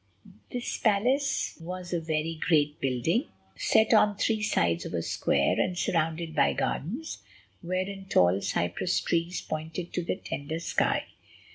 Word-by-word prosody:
This 245 -1 -3
palace 250 +7 +1
was 180 +1 -6
a 175 - +1
very 160 0 -1
great 150 -3 +3
building, 135 - +1 0.3
set 220 +1 +3
on 210 -2 +5
three 220 0 +1
sides 85 - +1
of - - -5
a 85 - -1
square, - - +1
and 180 -1 0
surrounded 165 -1 0
by - - +3
gardens, 240 - -3 0.4
wherein 185 +2 -3
tall 90 - +3
cypress 85 - 0
trees 170 +1 -1
pointed 160 +3 -5
to 180 - 0
the 170 - -1
tender 155 -3 -5
sky. 170 - +1
170 Hz, 140 wpm, -28 LUFS, 155-200 Hz, 0.4 s, on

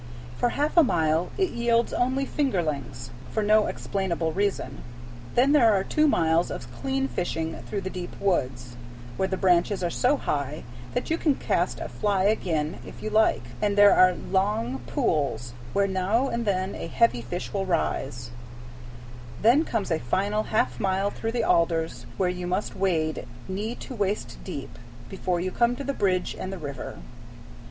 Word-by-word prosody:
For 240 - +1
half 295 +6 -1
a 335 - +9
mile 160 - +1
it 380 -2 +1
yields 235 0 +1
only 260 +2 +1
fingerlings, 150 - -2 0.2
for 215 - -1
no 215 +1 +4
explainable 175 -4 -2
reason; 195 -9 -1 0.5
then 260 +4 +5
there 250 -7 +6
are 195 -2 +2
two 305 +9 +2
miles 165 - +2
of 120 0 -7
clean 135 +2 -1
fishing 160 +4 -3
through 200 - -3
the 190 - -4
deep 180 -1 -7
woods, 125 -10 -1 0.4
where 190 - 0
the 190 0 -2
branches 185 +1 +2
are 175 - 0
so 260 - +2
high 145 - -2 0.3
that - - -2
you 330 - +1
can 295 -4 +2
cast - - 0
a - - -4
fly 200 -3 0
again 170 -7 0
if - - -11
you 215 - -3
like, 220 - +3 0.2
and 205 -1 +1
there 205 0 +8
are 185 -1 +6
long 190 - -1
pools, 120 -4 -1 0.2
where 200 0 +2
now 195 +8 +1
and 235 -1 -2
then 190 -1 0
a - - -5
heavy 230 - +2
fish 175 +10 -5
will 195 -1 -1
rise; 120 -8 -1 1.1
then 245 +8 +6
comes 225 - -2
a 160 - +2
final 200 - 0
half 125 - +1
mile 195 +1 +1
through 225 0 -4
the 240 -2 0
alders, 165 -1 +1
where 185 - +2
you 180 0 -3
must 185 +4 -2
wade, 165 -5 0 0.2
knee 210 +5 -3
to 260 - -8
waist 205 -2 -2
deep, - - -7 0.3
before 185 -2 -1
you 185 +1 -2
come 235 +3 +2
to 280 - -6
the 280 +1 -2
bridge 185 -6 0
and 185 - -4
the 195 - -5
river. 140 -5 -6
190 Hz, 175 wpm, -26 LUFS, 160-215 Hz, 1.1 s, a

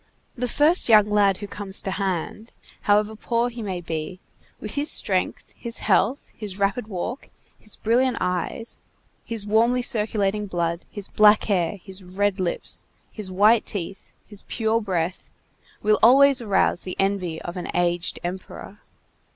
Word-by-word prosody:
The 250 0 -2
first 300 +4 +3
young 210 -2 +6
lad 200 -2 +3
who 205 - -7
comes 200 -1 0
to 190 - -2
hand, 195 +3 -3 0.3
however 210 +1 +2
poor 235 +2 0
he 240 -1 -8
may 190 -4 -4
be, 165 +1 -5 0.4
with 215 - -4
his 290 +1 0
strength, - - 0
his 235 -1 -4
health, 215 +6 +1
his 205 -4 -6
rapid 205 +3 0
walk, 220 +6 -5 0.3
his 215 - -7
brilliant 245 +2 +1
eyes, 180 +6 -3 0.4
his 225 -3 -4
warmly 230 +4 +2
circulating 210 -2 0
blood, 170 -2 -2
his 205 -2 -5
black 210 0 +5
hair, 190 -2 0
his 190 -1 -10
red 195 +2 -1
lips, 180 -2 -3 0.3
his 210 -4 -7
white 210 +4 +4
teeth, 195 0 -6
his 205 -2 -8
pure 225 0 0
breath, 185 -3 -3 0.5
will 215 0 +3
always 270 +3 +6
arouse 200 -4 +1
the 185 - -6
envy 195 -4 -1
of 175 - -6
an 180 - -5
aged 175 0 0
emperor. 185 +3 -7
205 Hz, 150 wpm, -23 LUFS, 185-225 Hz, 0.5 s, young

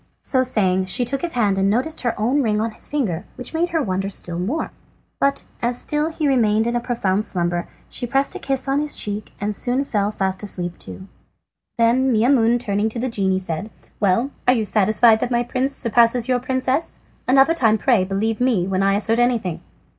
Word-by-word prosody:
So 260 - +2
saying 190 -7 +1
she 215 +7 +1
took 270 +3 -2
his 345 -1 -3
hand 205 -5 +1
and 195 +1 +2
noticed 255 +9 -1
her 240 -4 -2
own 250 +7 +2
ring 215 -4 +1
on 225 +1 -1
his - - -6
finger, 210 - -2
which 250 - -8
made 340 +2 0
her 325 -3 0
wonder 195 -1 -2
still 175 -3 -3
more. 240 - -2 0.5
But 275 0 +1 0.2
as 240 +1 +1
he - - +2
still 300 +2 -1
remained 225 -7 +2
in 235 +1 -1
a - - +2
profound 215 -5 -1
slumber 175 -4 -1 0.2
she 245 - -4
pressed 270 +3 +1
a - - -6
kiss 270 0 -2
on 270 +1 +1
his 300 0 -2
cheek 205 0 -3
and 210 +1 -2
soon 255 +6 0
fell 205 -5 0
fast 190 -2 -2
asleep 175 -4 -4
too. 190 - -10 0.7
Then 245 +3 +3
Maimoune 235 0 +3
turning 210 -2 -1
to 230 - -4
the 255 +2 -1
genie 190 -4 0
said: 185 +2 -4 0.3
"Well, 210 +7 +1 0.2
are 250 - +6
you 220 -3 0
satisfied 220 +2 +4
that 245 - -2
my 240 -1 +1
prince 260 +3 -2
surpasses 235 0 +2
your 250 -1 +2
princess? 260 +4 -2 0.3
Another 270 +5 +5
time 225 -9 +3
pray 230 -3 +2
believe 210 +4 -2
me 235 -8 +2
when 190 0 -1
I 195 0 +3
assert 220 +3 +1
anything." 225 -9 0
230 Hz, 205 wpm, -21 LUFS, 200-255 Hz, 0.7 s, are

